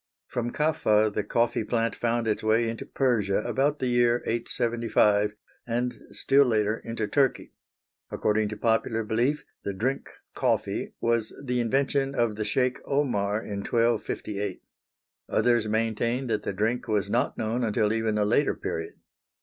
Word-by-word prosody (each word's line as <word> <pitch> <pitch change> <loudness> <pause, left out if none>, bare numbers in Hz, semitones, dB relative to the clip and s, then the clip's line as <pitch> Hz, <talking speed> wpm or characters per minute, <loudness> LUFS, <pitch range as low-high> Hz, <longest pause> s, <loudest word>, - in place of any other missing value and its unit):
From 120 -1 -3
Kaffa 110 -9 +2
the - - -1
coffee 115 +2 +1
plant 115 +1 0
found 120 -1 0
its 105 - 0
way 110 +2 +2
into 115 0 -5
Persia 105 -7 +1
about 145 +2 +1
the 130 - -2
year 120 -1 +2
875, 115 -3 +1 0.3
and 120 0 -2
still 140 +1 +3
later 110 -1 +1
into 115 -1 -3
Turkey. 135 +5 0 0.6
According 105 0 0
to 105 - -6
popular 115 0 +1
belief, 120 +7 0 0.2
the 100 - -3
drink 130 +8 -2 0.2
coffee - - -1
was 115 -2 0
the 125 -1 0
invention 135 +3 +1
of 120 -4 +1
the 110 - -2
Sheik 125 +1 +1
Omar 110 -7 0
in 100 -1 -5
1258. 105 -3 -1 0.7
Others 120 -3 +2
maintain 115 +3 0
that 110 -4 -1
the - - -3
drink 110 +6 -1
was 105 -2 0
not 115 +5 0
known 115 +3 -1
until 105 -1 +1
even 110 -1 0
a 105 - +2
later 120 +7 +2
period. 80 0 -4
115 Hz, 150 wpm, -27 LUFS, 105-120 Hz, 0.7 s, still